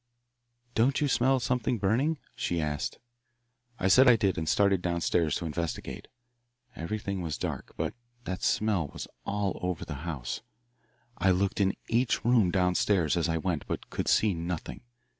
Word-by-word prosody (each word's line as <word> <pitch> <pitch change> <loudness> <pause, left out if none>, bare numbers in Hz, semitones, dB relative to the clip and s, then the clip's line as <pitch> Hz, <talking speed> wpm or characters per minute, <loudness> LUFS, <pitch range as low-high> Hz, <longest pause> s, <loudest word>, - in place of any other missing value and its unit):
"'Don't 130 +4 +3
you 150 - +2
smell 130 0 +3
something 125 0 0
burning?' 120 +11 +1 0.2
she 85 - -1
asked. 75 -2 -2 0.8
"I 95 - 0
said 130 +8 +7
I 125 - +8
did 100 -4 +1
and 80 -1 -2
started 100 -3 +3
down 85 -1 -1
stairs 80 -3 +2
to 85 - -3
investigate. 80 +1 -4 0.7
Everything 100 +2 -3
was 80 -4 -3
dark, - - -4
but - - -1 0.3
that 95 -5 -4
smell 105 -7 +1
was - - -7 0.2
all 100 -2 -1
over 90 -2 -2
the 80 - -5
house. 75 -8 -4 0.8
I 95 +2 +3
looked 95 +2 +1
in 95 -1 +2
each 120 0 +1
room 120 -6 +4
down 90 -1 +2
stairs 90 -5 +2
as 85 -1 +1
I 80 - +1
went, 80 -1 -2
but - - -5
could - - -2
see 105 -2 +4
nothing. 85 0 -4
95 Hz, 165 wpm, -29 LUFS, 85-110 Hz, 0.8 s, I